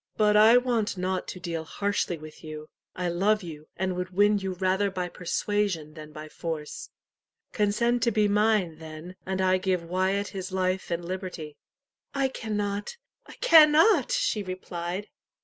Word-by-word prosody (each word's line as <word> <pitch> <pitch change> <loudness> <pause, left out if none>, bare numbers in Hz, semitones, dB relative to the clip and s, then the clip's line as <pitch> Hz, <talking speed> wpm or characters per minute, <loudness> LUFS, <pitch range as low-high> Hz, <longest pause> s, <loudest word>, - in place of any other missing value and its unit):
But 210 -1 +4
I 220 +3 +8
want 235 -5 0
not 185 0 -2
to 185 - -6
deal 165 -2 -4
harshly 200 0 -2
with 155 +1 -12
you. 155 -1 -8 0.3
I 180 -1 -2
love 200 +5 +1
you, 155 -3 -9
and 185 0 -1
would 180 0 -3
win 205 +2 +3
you 190 -1 -3
rather 190 +2 +1
by 180 -2 -3
persuasion 180 -3 -2
than 155 -1 -10
by 155 +1 -8
force. 155 -1 -6 0.6
Consent 235 +3 +1
to 235 0 +2
be 215 -2 +3
mine, 205 -6 +2
then, 160 +3 -9
and 190 0 -2
I 185 0 +3
give 185 -2 0
Wyat 190 +4 0
his 190 -2 -6
life 185 0 -1
and 170 0 -2
liberty." 180 -5 -6 0.6
"I 275 -1 +1
cannot 205 - -3 0.3
I - - -11
cannot!" 325 +1 +6
she - - +1
replied. 185 0 -5
185 Hz, 160 wpm, -27 LUFS, 175-210 Hz, 0.6 s, I